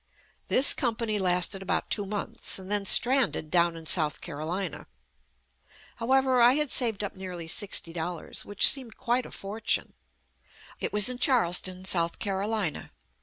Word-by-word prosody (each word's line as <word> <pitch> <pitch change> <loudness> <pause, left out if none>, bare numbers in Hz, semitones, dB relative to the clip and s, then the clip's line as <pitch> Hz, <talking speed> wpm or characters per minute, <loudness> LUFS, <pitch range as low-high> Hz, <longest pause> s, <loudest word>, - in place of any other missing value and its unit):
This 265 - +6
company 225 -3 -2
lasted 180 +1 +1
about 195 0 -3
two 205 -2 +1
months, 205 0 -1
then 200 +1 -2
stranded 245 - +3
down 170 -1 +2
in 165 - -11
South 155 -2 0
Carolina. 165 +4 -5 1.1
However, 260 +1 +2
I 240 +1 +6
had 300 -2 0
saved 225 -5 +1
up 200 - -5
nearly 180 -3 -8
sixty 170 -2 0
dollars, 170 0 -4
which 205 -1 -11
JUST - - +7
ME - - -7
seemed 235 -4 -15
quite 250 0 -1
a - - -15
fortune. 210 +3 -3 0.9
It - - -3
was 210 -1 +4
in 250 -1 -2
Charleston, 185 -7 +1
South 170 -3 +1
Carolina. 200 -4 -3
200 Hz, 150 wpm, -27 LUFS, 180-235 Hz, 1.1 s, JUST